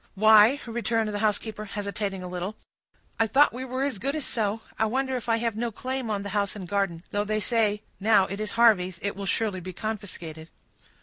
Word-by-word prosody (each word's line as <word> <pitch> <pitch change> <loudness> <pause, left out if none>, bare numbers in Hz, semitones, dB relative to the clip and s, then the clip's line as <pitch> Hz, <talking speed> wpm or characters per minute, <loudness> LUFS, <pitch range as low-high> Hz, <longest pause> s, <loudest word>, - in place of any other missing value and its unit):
"Why," 220 +5 +7
returned 230 -1 -1
the 205 - -2
housekeeper, 215 0 -1
hesitating 200 -2 -4
a - - -5
little, 180 +3 -4 0.6
"I 225 - +4
thought 275 +4 +5
we 255 +2 -5
were 260 +1 -2
as 275 -8 -2
good 275 +7 -1
as 305 - -3
so. 220 -1 -1 0.2
I 220 - +3
wonder 265 +3 -1
if 245 -1 -4
I 230 - +3
have 230 -2 -1
no 235 +2 -1
claim 255 +2 -4
on 205 -2 -1
the 200 - -5
house 200 -1 0
and 190 -4 -7
garden; 195 -4 -1
though 205 0 0
they 215 +1 -1
say, 215 -2 +1 0.2
now 205 -1 +5
it 195 +2 -5
is 215 0 -3
Harvey's, 205 -7 +4
it 200 - -1
will 200 0 -5
surely 210 -4 0
be 185 +1 -7
confiscated." 175 -7 -5
215 Hz, 210 wpm, -26 LUFS, 200-230 Hz, 0.6 s, Why